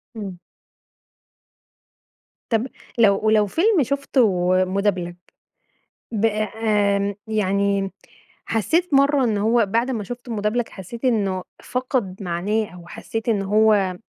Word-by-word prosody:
إمم. 195 -5 -6 2.1
طب 230 +2 +1 0.3
لو 205 -4 +5
ولو 215 -1 +4
فيلم 345 - +3
شفته 240 -9 +1 0.2
مدبلج، 185 -2 -1 1.0
ب 220 -1 0
آمم، 210 -2 +1
يعني 200 -2 0 0.5
حسيت 295 - 0
مرّة 275 0 +4
إن 220 -4 +1
هو 225 +2 +3
بعد 230 +6 0
ما 225 -5 -3
شفته 245 +3 -8
مدبلج، 220 +3 -1
حسيت 225 +6 -8
إنه 200 -7 +1 0.2
فقد 245 -7 -2
معناه 190 +6 -1
أو 175 -1 -12
حسيت 225 +5 -5
إن 210 -3 +2
هو 205 -2 +3
215 Hz, 110 wpm, -22 LUFS, 195-235 Hz, 2.1 s, لو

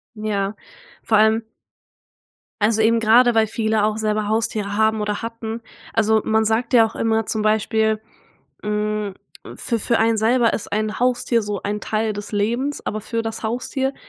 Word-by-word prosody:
Ja. 205 -1 -2 0.5
Vor 220 - +3
allem 220 +1 +4 1.2
also 220 +1 +2
eben 230 +1 +4
grade, 235 +2 +5
weil 220 -1 +3
viele 220 -1 0
auch 215 0 -1
selber 215 -1 -1
Haustiere 210 -2 -1
haben 220 0 +2
oder 210 0 -2
hatten. 230 0 -5 0.3
Also, 220 0 +3
man 220 0 +2
sagt 225 +3 0
ja 230 -2 +7
auch 220 - -7
immer 225 -1 +1
zum 220 - -2
Beispiel, 220 0 +1 0.6
hm, 210 -1 -2 0.4
für 230 -2 -2
für 230 +2 +1
einen 225 0 +3
selber 230 +1 +3
ist - - -4
ein 215 +1 -1
Haustier 245 -1 +1
so 205 -2 -4
ein 210 +1 -3
Teil 215 0 -1
des 205 +1 -7
Lebens, 235 +8 -1
aber 215 0 -3
für 230 +1 -3
das 225 0 -5
Haustier 260 +4 -2
220 Hz, 165 wpm, -21 LUFS, 215-230 Hz, 1.2 s, ja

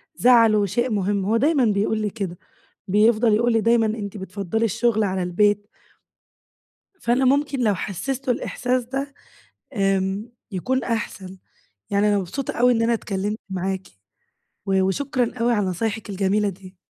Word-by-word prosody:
زعله 230 -5 +5
شيء 240 +6 -1
مهم، 200 -1 0
هو 220 +3 +2
دايمًا 280 +1 +3
بيقول 210 +1 +1
لي 210 -1 -1
كده. 195 -5 -5 0.5
بيفضل 215 +3 +4
يقول 235 +2 +2
لي 225 - +3
دايمًا: 230 0 +3
"أنتِ 215 -2 -4
بتفضّلي 200 +3 -3
الشغل 225 0 +1
على 190 -2 -1
البيت." 205 +3 +1 1.3
فأنا 245 +3 +1
ممكن 280 +1 +2
لو 215 -4 +2
حسسته 255 +8 -2
الإحساس 250 +1 -2
ده، 275 +3 -4 0.6
آمم 195 +2 0 0.2
يكون 255 +8 -1
أحسن. 195 -5 -4 0.5
يعني 205 +1 +2
أنا 205 - +3
مبسوطة 215 +9 -4
أوي 250 +1 +4
إن 230 - 0
أنا 230 +1 +2
اتكلمت 205 -1 -3
معاكِ، 190 0 -3 0.8
و 190 -1 +2
وشكرًا 245 +5 -1
أوي 240 +1 +2
على 205 -4 +1
نصايحِك 215 +4 -3
الجميلة 200 +2 +1
دي. 190 0 -10
215 Hz, 145 wpm, -23 LUFS, 195-240 Hz, 1.3 s, زعله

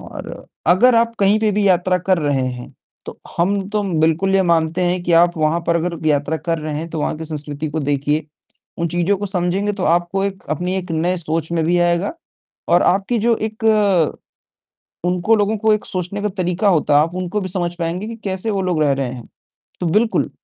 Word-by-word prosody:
और - - -9 0.2
अगर 195 +9 +5
आप 230 0 +2
कहीं 200 +2 +4
पे 215 -1 +2
भी 205 0 +1
यात्रा 185 0 +2
कर 185 +1 +1
रहे 145 -4 0
हैं, 125 -1 -6 0.3
तो - - -8 0.2
हम 195 +2 0
तो 210 0 0 0.2
बिल्कुल 165 +5 +2
ये 195 - +4
मानते 165 -1 +1
हैं 180 0 0
कि 175 - -1
आप 175 0 +1
वहाँ 155 +2 +1
पर 170 - +2
अगर 170 -1 -3
यात्रा 150 +1 +1
कर 165 0 -2
रहे 155 -1 -4
हैं 165 - -5
तो 160 - -3
वहाँ 150 - -1
की 160 - -5
संस्कृति 150 -1 -4
को 160 +2 -3
देखिए, 145 +2 0 0.5
उन 170 - 0
चीज़ों 175 +4 +1
को 205 - -3
समझेंगे 190 +2 0
तो 195 -2 -3
आपको 175 +4 +1
एक, 195 -1 -4
अपनी 180 +5 -1
एक 180 -2 -5
नई 170 +3 0
सोच 160 -1 -2
में 165 -1 +1
भी 175 +2 +2
आएगा 175 - +1 0.6
और 175 +1 +4
आपकी 195 +6 +1
जो 230 +1 +2
एक 220 +1 -5 1.4
उनको 180 +5 +2
लोगों 210 +1 +1
को 220 +1 +3
एक 210 - -2
सोचने 185 +2 -2
का 210 - 0
तरीका 185 +1 -1
होता 155 -5 +2
है, 150 - +6
आप 165 +2 -4
उनको 185 +3 -2
भी 185 - -3
समझ 175 -1 -1
पाएँगे 170 +5 -3
कि 230 - -6
कैसे 190 +2 -2
वो 195 -2 -1
लोग 180 -4 0
रह 145 -2 +3
रहे 135 -2 -2
हैं, 125 -2 -8 0.6
तो - - -2
बिल्कुल, 215 +7 +1
175 Hz, 215 wpm, -19 LUFS, 160-195 Hz, 1.4 s, है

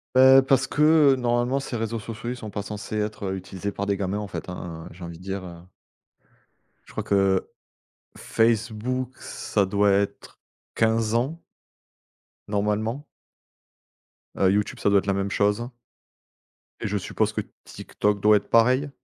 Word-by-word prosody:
heu, 130 +1 +8
parce 135 0 +2
que, 150 - -2 0.3
heu, - - +2
normalement, 120 +1 +1
ces 135 -2 -5
réseaux 115 0 -2
sociaux, 115 +2 -6
ils 125 - -3
sont 110 -3 -7
pas 100 0 -4
censés 105 +1 -6
être 105 -2 -2
utilisés 95 +1 -5
par 100 - -4
des 100 -1 0
gamins, 95 +1 -2
en 105 - -5
fait, 95 - -7
hein, 85 -2 -7
j'ai 90 +2 -12
envie 85 -1 -7
de 90 - -15
dire, 95 0 -4
heu. 85 -1 -9 1.3
Je - - -16
crois - - -4
que 95 -1 +2 0.7
Facebook, 115 +3 0
ça 100 -2 -1
doit 100 +1 +2
être 100 0 -1 0.4
15 110 -1 +2
ans 140 +8 -1 1.1
normalement 105 +6 -1 1.3
et 95 - +4
YouTube, 105 +1 -1
ça - - +2
doit 100 0 +5
être 95 - -7
la 100 - +2
même 100 0 -2
chose 105 +5 +1 1.1
et - - -2
je 105 0 -1
suppose 100 - -1
que - - -1 0.2
TikTok 105 -1 -2
doit 105 +1 +6
être 100 - -7
pareil? 130 +5 +4
105 Hz, 160 wpm, -25 LUFS, 100-120 Hz, 1.3 s, heu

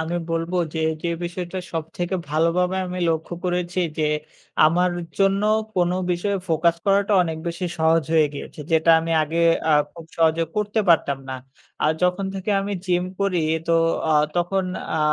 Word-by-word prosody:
আমি 165 +2 -2
বলবো 165 +2 -1 0.2
যে, 160 - -1 0.2
যে 170 - -1 0.2
বিষয়টা 180 +1 -4
সবথেকে 165 +3 -3 0.2
ভালোভাবে 170 +4 +1
আমি 180 0 -5
লক্ষ্য 160 +2 -2
করেছি 180 0 -1 0.2
যে, 155 -1 +2 0.6
আমার 180 +3 +2 0.3
জন্য 195 +1 +3 0.3
কোনো 180 0 +2 0.2
বিষয়ে 200 +3 -1
focus 165 +1 +2
করাটা 200 +1 +3
অনেক 160 -2 -3
বেশি 170 +2 -4
সহজ 160 0 +3
হয়ে 155 -1 +5
গিয়েছে, 145 - -8
যেটা 160 +1 +4
আমি 165 +1 -4
আগে 165 +3 -1 0.3
আ - - +5 0.2
খুব 165 -1 -11
সহজে 165 0 +3
করতে 210 +1 0
পারতাম 140 -5 +3
না। 130 - -3 0.5
আ - - +4 0.2
যখন 180 +2 +1
থেকে 190 +2 -3
আমি 200 +1 -3
gym 180 0 +1 0.2
করি 185 -4 +1 0.3
তো 165 - +4 0.4
আ - - +4 0.2
তখন 185 +2 +1 0.3
আ - - 0
175 Hz, 165 wpm, -23 LUFS, 165-185 Hz, 0.6 s, হয়ে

